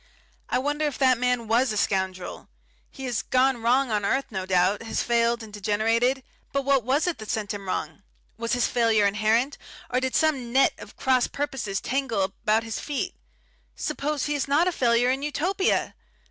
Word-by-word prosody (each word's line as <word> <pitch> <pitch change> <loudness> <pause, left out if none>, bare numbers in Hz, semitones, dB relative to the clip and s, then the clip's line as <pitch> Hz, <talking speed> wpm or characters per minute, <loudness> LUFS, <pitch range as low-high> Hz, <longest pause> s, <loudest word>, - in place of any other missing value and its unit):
I - - +1
wonder 290 +4 -1
if 295 - -2
that 260 -3 +3
man 250 -2 0
was 235 +2 +2
a 215 - -2
scoundrel. 190 -2 -2 0.4
He 270 - -8
has 240 -4 -1
gone 260 -1 +2
wrong 250 +2 +2
on 210 -1 0
earth, 270 +7 +1
no 190 -2 -4
doubt, 185 +2 +2
has 225 - -2
failed 235 0 +1
and 215 -2 -11
degenerated, 225 +6 +1 0.3
but 275 -1 -1
what 275 -3 +3
was 270 +6 +1
it 350 -9 -2
sent 215 -2 -2
him 200 -1 -7
wrong? 160 -1 -3 0.3
Was 230 +2 -2
his 245 -1 +2
failure 225 -3 +3
inherent, 220 +7 +1 0.3
or 250 - +2
did 260 0 -2
some 275 -7 +1
net 270 +2 +4
of - - -11
cross 255 -2 +2
purposes 265 -9 -3
tangle 260 -6 -1
about 215 +3 0
his 225 -1 -4
feet? 290 -2 -3 0.6
Suppose 295 0 -2
he 295 - -1
is 285 -2 -1
not 300 +6 +3
a - - +2
failure 245 -4 +2
in 265 +1 -1
Utopia!... 340 +7 0
245 Hz, 185 wpm, -25 LUFS, 215-270 Hz, 0.6 s, net